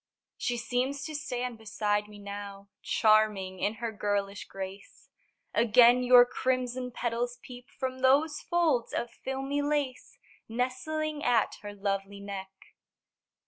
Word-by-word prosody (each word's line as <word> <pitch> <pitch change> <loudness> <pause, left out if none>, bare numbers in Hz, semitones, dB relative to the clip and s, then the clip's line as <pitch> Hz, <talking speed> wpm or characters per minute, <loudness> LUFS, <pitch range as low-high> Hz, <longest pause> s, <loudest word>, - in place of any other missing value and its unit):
She 245 -1 -1
seems 255 +4 -1
to 310 - -5
stand 250 -5 -3
beside 210 -1 -1
me 210 0 -12
now, 200 0 -8
Charming 210 -4 +2
in 210 +2 0
her 230 +1 -3
girlish 205 -1 -2
grace; 195 +1 -9 0.4
Again 240 +2 +6
your 250 -1 +8
crimson 255 0 -1
petals 240 0 -2
peep 245 0 -11
From 260 -1 -4
those 285 +4 +3
folds 320 -9 +1
of 235 - -2
filmy 270 +2 -3
lace 285 -3 -2 0.3
Nestling 290 +6 -2
at 235 -3 +2
her 205 0 -8
lovely 200 0 -2
neck. 200 -1 -6
240 Hz, 125 wpm, -29 LUFS, 205-260 Hz, 0.4 s, your